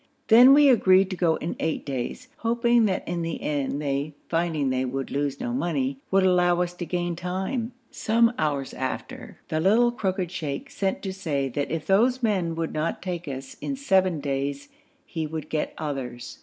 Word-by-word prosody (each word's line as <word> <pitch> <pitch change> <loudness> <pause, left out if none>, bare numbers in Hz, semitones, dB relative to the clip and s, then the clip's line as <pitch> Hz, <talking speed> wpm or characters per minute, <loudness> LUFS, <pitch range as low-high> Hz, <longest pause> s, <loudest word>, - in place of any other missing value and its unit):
Then 250 +4 +9
we 295 0 +6
agreed 195 -6 +5
to - - -2
go 170 -3 +2
in 165 - -4
eight 160 - -2
days, 135 - -4
hoping 235 0 +2
that 190 -3 -1
in 175 0 -2
the 165 -1 -3
end 145 -1 -2
they, 145 +1 -2
finding 165 -5 0
they 130 0 0
would 135 +1 -3
lose 140 0 -1
no 245 - -3
money, 140 - -1
would 195 0 +3
allow 180 -1 +3
us 175 0 -5
to 175 -1 -6
gain 175 -1 -1
time. 190 +8 -3 0.2
Some 230 +2 +2
hours 145 -3 -1
after 130 0 -5
the 155 - 0
little 220 +8 +4
crooked 190 -6 -2
sheikh 150 -6 -4
sent 195 -1 -2
to 190 -2 -3
say 145 -8 -2
that 140 +3 -2
if 160 -1 -3
those 245 +6 +3
men 185 -7 +1
would 165 0 -3
not 155 +3 -2
take 175 -3 -4
us 135 -1 -7
in 275 - -2
seven 190 - +2
days 140 - -3 0.4
he 160 -3 -4
would 160 0 -6
get 155 - -2
others. 135 -5 -5
170 Hz, 185 wpm, -25 LUFS, 145-195 Hz, 0.4 s, Then